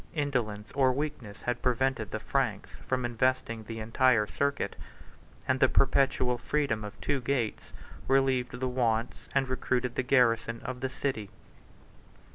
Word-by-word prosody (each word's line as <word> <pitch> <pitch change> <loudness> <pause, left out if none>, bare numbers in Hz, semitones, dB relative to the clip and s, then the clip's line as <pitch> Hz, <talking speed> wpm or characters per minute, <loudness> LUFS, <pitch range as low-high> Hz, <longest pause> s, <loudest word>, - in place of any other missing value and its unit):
Indolence 120 -8 -2
or 135 -2 +3
weakness 130 -7 -4
had 125 - -1
prevented 125 -3 +1
the 110 - -3
Franks 115 -4 -1 0.2
from 130 -1 0
investing 120 -2 0
the 115 +1 -6
entire 115 0 +3
circuit; 140 +6 -1 0.7
and 130 0 +2
the - - +5
perpetual 130 -3 +2
freedom 140 -6 0
of 105 -1 -8
two 140 -2 0
gates 125 -3 -2 0.4
relieved 130 -2 +2
the 130 - 0
wants 120 -2 -1
and 135 -1 +3
recruited 130 -1 -1
the - - 0
garrison 115 -3 +2
of 130 -1 -4
the 130 +1 -2
city. 130 -5 -3
125 Hz, 140 wpm, -29 LUFS, 115-135 Hz, 0.7 s, the